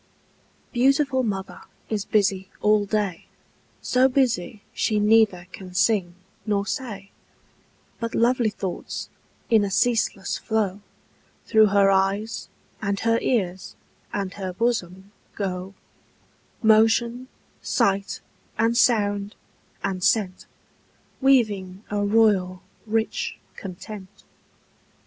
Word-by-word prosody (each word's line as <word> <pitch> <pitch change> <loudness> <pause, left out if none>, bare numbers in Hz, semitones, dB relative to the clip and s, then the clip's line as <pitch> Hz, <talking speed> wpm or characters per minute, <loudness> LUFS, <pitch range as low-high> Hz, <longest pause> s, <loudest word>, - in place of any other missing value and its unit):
_ - - -37
Beautiful 270 +1 +3
mother 195 -5 -4 0.3
is 210 -2 -2
busy 195 -2 +1
all 210 -1 +3
day, 205 -5 -2 0.6
So 255 +1 +3
busy 235 -6 0
she 215 -1 +1
neither 210 -4 +4
can 185 -1 -10
sing 185 -2 +2 0.3
nor 205 -2 0
say; 200 -5 -5 0.9
But 230 -1 -3
lovely 240 -1 +3
thoughts, 195 -3 -5 0.4
in 220 -2 +5
a 200 - -1
ceaseless 215 -2 0
flow, 205 -3 -1 0.6
Through 220 -1 +5
her 200 -1 +4
eyes, 195 +3 0 0.3
and 200 -1 -1
her 230 0 +2
ears, 190 -7 -1 0.4
and 195 -1 -3
her 190 -2 -5
bosom 190 -3 -2 0.2
go 190 -1 -4 0.9
Motion, 225 +3 +3 0.3
sight, 195 0 0 0.4
and 225 +2 +2
sound, 205 -4 +2 0.5
and 190 -2 -2
scent, 190 -4 +1 0.7
Weaving 210 -8 +2
a 205 0 0
royal, 200 -4 +2 0.2
rich 220 +1 -1 0.2
content. 195 +1 -9
205 Hz, 105 wpm, -24 LUFS, 195-225 Hz, 0.9 s, in